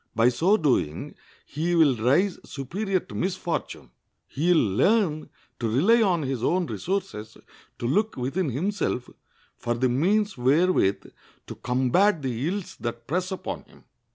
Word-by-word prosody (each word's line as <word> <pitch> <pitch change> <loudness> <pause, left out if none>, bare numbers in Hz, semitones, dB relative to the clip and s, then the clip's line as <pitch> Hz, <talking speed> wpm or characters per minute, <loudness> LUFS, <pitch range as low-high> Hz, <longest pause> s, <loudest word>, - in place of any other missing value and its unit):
By 115 +2 +5
so 170 - +2
doing 125 - 0 0.3
he 165 +5 -2
will 155 -6 +5
rise 140 - +2
superior 185 - -2
to 185 - -14
misfortune. 175 - -3 0.3
He 165 +6 0
will 110 - +2
learn 185 - +2 0.3
to 115 - -1
rely 190 - +4
on 180 -7 +2
his 130 -3 -3
own 180 0 +1
resources, 175 - -4 0.4
to - - -5
look 210 - 0
within 140 +7 -1
himself 160 - -2 0.5
for 120 0 -2
the 130 +2 +1
means 195 - +1
wherewith 135 - +2 0.4
to - - -7
combat 140 +8 +1
the 130 +2 -2
ills 195 +1 -4
that 115 0 -5
press 180 +7 -2
upon 190 - -5
him. - - -21
155 Hz, 145 wpm, -25 LUFS, 125-190 Hz, 0.5 s, By